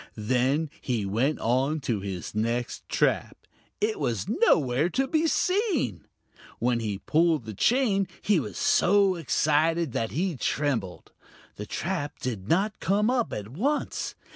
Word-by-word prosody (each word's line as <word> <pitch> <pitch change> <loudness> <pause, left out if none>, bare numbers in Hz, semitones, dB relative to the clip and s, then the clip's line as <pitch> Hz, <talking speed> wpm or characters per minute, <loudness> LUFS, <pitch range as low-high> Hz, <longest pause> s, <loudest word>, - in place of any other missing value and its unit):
Then 130 +7 +1
he 115 -6 -1
went 120 +10 0
on 130 +7 +1
to 115 -5 -1
his 95 -2 -5
next 115 +3 -2
trap; - - +1 0.4
it 430 +1 0
was - - -1
nowhere 145 - +2
to 265 +8 0
be 320 +1 +1
seen. 365 - 0 0.5
When 120 0 +1
he 105 -3 -3
pulled 160 - +1
the 110 - -6
chain 205 - +2
he 205 -5 +2
was 105 - -6
so 200 0 +4
excited 165 -1 +1
that 115 -1 -1
he 175 +2 -1
trembled. 125 -8 -2 0.5
The 105 - -6
trap 170 -5 -3
did 110 -6 -5
not 200 +5 +1
come 210 +4 +2
up 250 -3 0
at 105 0 -5
once. 265 - -2
150 Hz, 140 wpm, -27 LUFS, -, 0.5 s, so